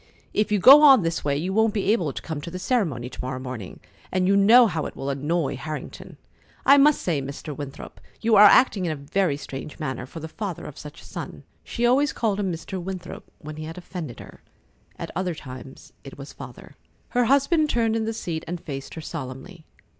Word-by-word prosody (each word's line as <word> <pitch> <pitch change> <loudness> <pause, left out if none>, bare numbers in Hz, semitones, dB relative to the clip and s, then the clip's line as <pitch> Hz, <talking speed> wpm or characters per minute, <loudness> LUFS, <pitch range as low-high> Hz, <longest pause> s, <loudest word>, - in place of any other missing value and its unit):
If 210 +1 0
you 210 - +3
go 270 +9 +9
on 270 -8 +7
this 165 -1 -2
way, 140 -1 0
you 180 +6 -2
won't 220 +1 +2
be 200 -1 +1
able 175 -10 +1
to - - -7
come 160 -3 -5
to 170 - -7
the 180 - -6
ceremony 180 - -1
to 125 - -8
morrow 130 0 -4
morning, 125 -7 -7 0.3
and 185 0 +1
you 200 - +4
know 225 +5 +7
how 165 -7 -1
that - - -6
will 140 +1 -3
annoy 145 +1 -1
Harrington. 155 +2 -8 0.5
I 280 +1 +7
must 295 +1 +4
say, 160 -6 0
Mr. 140 +2 -7
Winthrop, 140 -2 -9 0.2
you 225 -1 +2
are 210 +1 +9
acting 205 -2 +5
in - - -1
a - - -2
very 150 +2 -1
strange 140 +1 -8
manner, 130 -4 -4
for 165 - -9
the 160 - -6
father 185 +1 -6
of 150 - -9
such 150 -1 -11
a - - -15
son." - - -8 0.2
She 240 - -2
always 270 +4 +3
called 210 -3 -1
him 195 -3 -1
Mr. 175 +3 -6
Winthrop 180 -1 -8
when 155 -1 -9
he 155 - -6
had 165 +2 -8
offended 175 -7 -7
her. - - -13 0.6
At - - -6
other 180 -2 -2
times 130 -2 -11
it 135 - -11
was 140 +1 -10
"Father." 130 -3 -12 0.3
Her 245 0 +2
husband 280 +5 +3
turned 225 -3 +1
in 225 -1 -1
the 225 - -1
seat 165 -7 -4
and 175 +1 -4
faced 135 -4 -7
her 160 - -6
solemnly. 155 +3 -8
170 Hz, 220 wpm, -24 LUFS, 145-210 Hz, 0.6 s, go